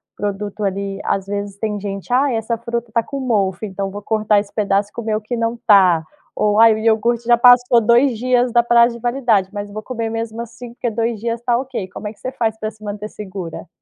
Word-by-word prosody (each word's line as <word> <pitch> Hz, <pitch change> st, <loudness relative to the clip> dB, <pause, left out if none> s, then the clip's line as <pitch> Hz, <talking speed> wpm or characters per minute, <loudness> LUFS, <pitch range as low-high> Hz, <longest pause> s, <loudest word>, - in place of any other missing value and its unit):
produto, 205 Hz, +1 st, -4 dB
ali, 195 Hz, 0 st, -2 dB
às 195 Hz, 0 st, -1 dB
vezes 200 Hz, 0 st, -4 dB
tem 210 Hz, -1 st, -3 dB
gente: 200 Hz, +3 st, -6 dB
"Aí 260 Hz, -1 st, +2 dB
essa 225 Hz, +1 st, -2 dB
fruta 235 Hz, 0 st, -4 dB
tá 230 Hz, 0 st, +1 dB
com 275 Hz, +3 st, -6 dB
mofo, 205 Hz, -7 st, 0 dB
então 195 Hz, -1 st, -4 dB
vou 205 Hz, +1 st, -7 dB
cortar 215 Hz, 0 st, +2 dB
esse 200 Hz, 0 st, -6 dB
pedaço, 205 Hz, -1 st, 0 dB
comer 215 Hz, -2 st, -2 dB
que 240 Hz, +3 st, -4 dB
não 230 Hz, +1 st, -1 dB
tá 185 Hz, -6 st, +6 dB, 0.3 s
ou, 210 Hz, 0 st, +2 dB
aí, 225 Hz, -1 st, +8 dB
o 215 Hz, -, -3 dB
iogurte 230 Hz, +2 st, +1 dB
já 240 Hz, 0 st, +5 dB
passou 245 Hz, 0 st, +6 dB
2 235 Hz, +2 st, +3 dB
dias 250 Hz, +1 st, +1 dB
da 235 Hz, +1 st, +4 dB
prazo 235 Hz, 0 st, +4 dB
de -, -, -9 dB
validade, 240 Hz, -6 st, +1 dB
mas 205 Hz, 0 st, -5 dB
vou 215 Hz, +1 st, -6 dB
comer 230 Hz, -3 st, -4 dB
mesmo 225 Hz, 0 st, -4 dB
assim 235 Hz, +1 st, -9 dB
porque 240 Hz, -, -3 dB
2 230 Hz, -1 st, -2 dB
dias 230 Hz, +1 st, -2 dB
está 240 Hz, 0 st, 0 dB
ok." 255 Hz, -8 st, -5 dB
Como 210 Hz, +3 st, -7 dB
é -, -, -5 dB
que -, -, -29 dB
você 255 Hz, -, -5 dB
faz 220 Hz, -4 st, -1 dB
pra 215 Hz, 0 st, -3 dB
se 215 Hz, -, -19 dB
manter 205 Hz, 0 st, -5 dB
segura? 190 Hz, -5 st, -8 dB
220 Hz, 225 wpm, -19 LUFS, 205-235 Hz, 0.3 s, aí